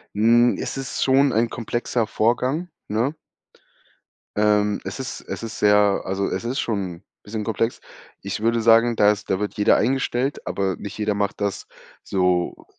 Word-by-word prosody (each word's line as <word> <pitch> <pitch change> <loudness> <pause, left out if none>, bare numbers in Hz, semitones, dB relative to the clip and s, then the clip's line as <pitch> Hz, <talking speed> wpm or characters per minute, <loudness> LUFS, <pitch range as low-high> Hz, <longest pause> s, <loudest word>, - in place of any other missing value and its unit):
Hm, 120 +3 +4
es - - -4
ist 135 0 -4
schon 135 0 +4
ein 115 +1 +2
komplexer 120 0 -2
Vorgang, 125 +11 0 0.2
ne? 115 +8 -1 1.2
Ähm 105 -1 +2
es - - -6
ist 130 - -5
es - - -7
ist 115 -1 -6
sehr 105 -1 +4
also 95 +1 -1
es - - -3
ist 125 +4 -2
schon 95 -5 -3 0.2
bisschen 105 +1 -5
komplex. 115 +2 -1 0.4
Ich 100 +1 -4
würde 115 +1 +2
sagen, 115 +1 +5
da 105 0 +6
ist 105 0 -5
da 95 - +1
wird 105 0 -3
jeder 105 - +4
eingestellt, 130 +2 -1
aber 95 -2 -1
nicht 100 +1 -8
jeder 105 0 0
macht 100 -1 -2
das 100 -1 -2 0.4
so 90 -2 0
110 Hz, 165 wpm, -22 LUFS, 100-120 Hz, 1.2 s, da